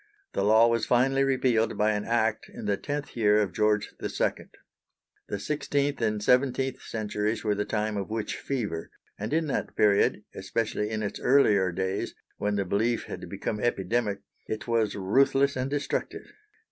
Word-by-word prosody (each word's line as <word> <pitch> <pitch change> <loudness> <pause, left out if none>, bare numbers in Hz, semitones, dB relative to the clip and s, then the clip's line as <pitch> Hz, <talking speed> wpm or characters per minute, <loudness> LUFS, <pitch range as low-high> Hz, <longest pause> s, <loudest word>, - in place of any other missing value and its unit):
The - - 0
law 110 +2 +6
was 115 -1 +1
finally 135 +2 +3
repealed 125 -4 +1
by 105 +1 +3
an 105 -1 -2
Act 115 -2 0
in - - -8
the 100 -1 +2
tenth 145 +6 -5
year 105 -2 +4
of 100 -4 0
George 105 -1 +1
II. - - -1 0.8
The - - -3
sixteenth 145 +3 -1
and 105 -2 0
seventeenth 130 +1 +2
centuries 110 0 -2
were 105 -2 +2
the 105 0 -1
time 105 -1 -1
of 100 0 -3
witch 110 -1 -3
fever, 105 -12 -3 0.3
and 105 +2 -4
in 160 +1 +1
that 145 - -3
period, 105 0 +3
especially 105 +1 -2
in 110 -1 -2
its 100 - -4
earlier 105 -9 +4
days 95 +2 -2 0.2
when 105 0 -1
the 100 -1 0
belief 110 +6 0
had - - -8
become 105 - -3
epidemic, 105 -1 0 0.3
it 110 +2 -4
was 115 -3 +1
ruthless 135 +8 +3
and 130 +1 -2
destructive. 145 0 -3
110 Hz, 165 wpm, -27 LUFS, 105-125 Hz, 0.8 s, law